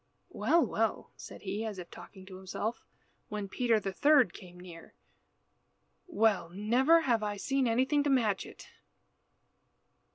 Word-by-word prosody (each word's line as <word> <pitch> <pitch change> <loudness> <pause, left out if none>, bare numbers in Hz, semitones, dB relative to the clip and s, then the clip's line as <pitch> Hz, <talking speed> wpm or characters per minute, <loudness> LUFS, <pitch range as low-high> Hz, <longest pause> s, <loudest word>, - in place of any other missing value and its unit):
"Well, 340 0 +2
well," - - -2
said - - -11
he, 200 +2 -3
as 215 -3 -5
if 175 -2 -9
talking 190 -2 -13
to 190 -1 -11
himself, 195 +4 -5 0.5
when 210 -1 -4
Peter 230 +2 +1
the 195 -2 -5
third 290 +2 +4
came 180 -2 -13
near. 175 -2 -13 1.1
"Well! 220 - +1
never 235 - +2
before 270 - -1
have 230 -2 +2
I 205 -1 -3
seen 270 +4 0
anything 260 +5 +2
to - - +1
match 225 -8 +1
it." - - -13
215 Hz, 150 wpm, -30 LUFS, 190-255 Hz, 1.1 s, third